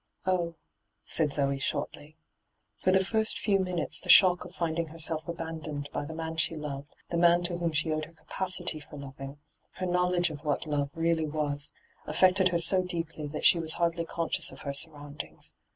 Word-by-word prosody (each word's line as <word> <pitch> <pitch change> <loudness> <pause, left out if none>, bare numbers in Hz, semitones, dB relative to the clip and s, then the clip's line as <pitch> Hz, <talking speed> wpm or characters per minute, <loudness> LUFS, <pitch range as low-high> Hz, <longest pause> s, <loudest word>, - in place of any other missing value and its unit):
* - - -51
' - - -32
Oh,' 175 -3 +1 0.5
said 155 -3 +1
Zoe 140 -1 0
shortly. 150 +2 -4 0.6
For 185 - +3
the 190 0 +4
first 220 +2 +1
few 200 -2 +2
minutes 180 -3 -1
the 180 - -9
shock 180 0 +8
of 180 +1 -12
finding 165 -1 -1
herself 160 0 -3
abandoned 160 -3 -5
by 145 - -2
the 160 +2 -7
man 160 0 -4
she 160 +1 +2
loved, 145 -2 -5 0.2
the 170 - 0
man 175 +1 +5
to 175 0 0
whom 170 -1 0
she 160 +1 0
owed 155 0 -1
her - - -16
capacity 180 -1 -2
for 145 0 -11
loving, 135 0 -8 0.4
her 185 - -3
knowledge 180 -1 +2
of 150 0 -8
what 150 0 0
love 145 -2 0
really 165 -1 +1
was, 145 -1 -2 0.4
affected 185 +4 +4
her 180 -2 +1
so 175 +3 +3
deeply 165 -4 -4
that 150 +1 -4
she 170 - +7
was 160 -1 -1
hardly 170 0 0
conscious 165 0 -2
of - - -11
her 140 - -3
surround 145 0 -2
ings. - - -11
165 Hz, 200 wpm, -29 LUFS, 150-175 Hz, 0.6 s, shock